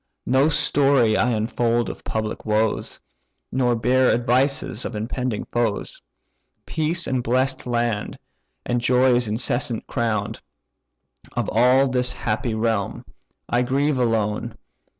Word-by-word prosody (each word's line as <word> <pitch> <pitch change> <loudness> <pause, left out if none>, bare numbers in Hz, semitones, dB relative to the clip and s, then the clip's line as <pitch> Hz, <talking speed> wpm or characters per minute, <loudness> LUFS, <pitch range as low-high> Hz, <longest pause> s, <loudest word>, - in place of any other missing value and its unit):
No 130 +4 +3
story 140 -6 +3
I 120 - +2
unfold 115 +1 0
of - - -7
public 110 -1 -3
woes, 110 0 -1 0.5
Nor 125 -2 +1
bear 125 +3 +3
advices 125 0 +1
of 115 - -5
impending 115 +1 -3
foes: 115 -4 -2 0.6
Peace 165 +2 -1
the - - -3
blest 130 +2 0
land, 120 -3 -1 0.5
and 120 0 0
joys 125 -1 +3
incessant 120 +2 -1
crown: 115 -3 -1 1.0
Of - - -2
all 125 +4 +4
this 125 -1 0
happy 110 +1 -2
realm, 110 -3 -1 0.4
I 120 - +1
grieve 135 +2 +1
alone. 115 -1 -1
120 Hz, 115 wpm, -22 LUFS, 110-130 Hz, 1.0 s, all